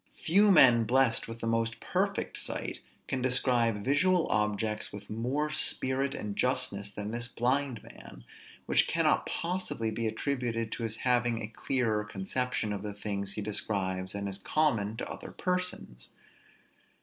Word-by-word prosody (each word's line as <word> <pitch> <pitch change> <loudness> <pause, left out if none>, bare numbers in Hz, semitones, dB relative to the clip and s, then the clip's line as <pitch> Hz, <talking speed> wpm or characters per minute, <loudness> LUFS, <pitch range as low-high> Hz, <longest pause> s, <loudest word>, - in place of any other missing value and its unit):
Few 200 +5 +4
men 125 - +7
blessed 125 0 +2
with 115 0 -8
the - - -3
most 115 0 0
perfect - - -1
sight - - -3 0.3
can 130 -2 -2
describe 120 -4 +2
visual 175 +5 +3
objects 105 0 0
with 100 0 -10
more 130 +7 -1
spirit 135 -2 0
and 105 -1 -4
justness 125 -6 -1
than 105 +1 -5
this 120 +1 -2
blind 125 0 0
man; - - -13 0.4
which - - +3
cannot - - +2
possibly 170 -10 -2
be 115 0 -2
attributed 115 -2 -2
to - - -4
his 110 -1 -2
having 120 -2 +2
a 110 - -3
clearer 110 -1 0
conception 105 +2 -2
of 100 - -4
the 105 -1 -5
things 100 -1 -3
he 105 - -4
describes 95 -3 -1
than 100 0 -3
is 100 0 -1
common 110 -6 +1
to - - -4
other - - -7
persons. 180 - -3
115 Hz, 150 wpm, -30 LUFS, 105-130 Hz, 0.4 s, men